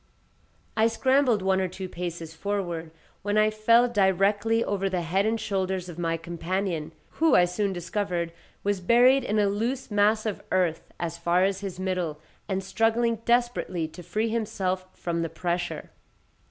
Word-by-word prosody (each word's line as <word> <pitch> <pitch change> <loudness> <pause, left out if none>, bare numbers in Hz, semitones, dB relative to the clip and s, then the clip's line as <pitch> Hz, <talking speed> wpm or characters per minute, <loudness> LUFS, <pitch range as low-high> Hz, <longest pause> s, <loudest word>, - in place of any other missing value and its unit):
I 220 +1 +4
scrambled 255 -2 +2
one 190 0 +2
or 185 - 0
two 185 +1 -6
paces 170 -2 -6
forward, 175 -3 -3 0.3
when 205 +1 0
I 215 0 +4
fell 230 +3 +4
directly 205 +1 +2
over 195 -1 -1
the 180 -2 -1
head 190 +5 +1
and 225 +1 0
shoulders 190 -3 -2
of 175 0 -8
my 165 -1 0
companion, 170 0 -3 0.3
who, 325 0 +5
I 175 - +6
soon 195 +3 -1
discovered, 175 -1 -2 0.3
was 200 -2 0
buried 245 +7 +5
in 210 - -1
a 210 - +4
loose 230 +6 -2
mass 210 +2 +3
of 215 -3 -2
earth 180 -4 0
as 170 -1 -3
far 175 +2 +2
as 190 0 +1
his 195 -2 -6
middle, 180 -5 -2 0.3
and 190 0 -1
struggling 225 +4 +1
desperately 240 -8 +1
to 180 - -11
free 210 +7 -1
himself 195 -5 -2
from 170 -1 -2
the 165 - -2
pressure. 175 -1 -3
190 Hz, 165 wpm, -26 LUFS, 175-215 Hz, 0.3 s, I